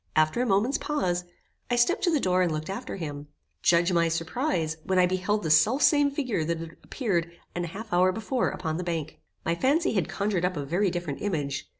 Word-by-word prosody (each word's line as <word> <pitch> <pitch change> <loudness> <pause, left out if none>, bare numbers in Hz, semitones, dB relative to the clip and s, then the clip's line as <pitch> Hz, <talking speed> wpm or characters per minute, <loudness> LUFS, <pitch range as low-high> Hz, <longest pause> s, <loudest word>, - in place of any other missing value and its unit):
After 155 +9 +3
a 250 - 0
moment's 215 +7 +2
pause, 180 -12 -1 0.4
I 245 - +2
stepped 240 - +2
to - - +3
the 315 -4 +2
door 185 -5 +2
and 175 -2 +2
looked 155 +3 -3
after 195 - -5
him. 145 -5 -6 0.3
Judge 170 +2 +3
my 170 -1 +3
surprize, 165 - -1
when 190 - 0
I 180 - +6
beheld 185 +3 0
the 160 - 0
self 210 - +4
same 290 -2 +5
figure 255 - -1
that 165 +1 -1
had 165 0 -8
appeared 175 -10 -1 0.2
an 175 0 -2
half 205 +5 -7
hour 180 +1 +4
before 225 +5 -1
upon 160 -3 -3
the 180 - -3
bank. 165 -3 -4 0.3
My 170 - +1
fancy 280 - +2
had 190 -7 0
conjured 200 -3 -1
up 180 -2 0
a 145 - -3
very 180 +7 +1
different 175 -5 -4
image. 145 -8 -2
180 Hz, 215 wpm, -27 LUFS, 165-220 Hz, 0.4 s, I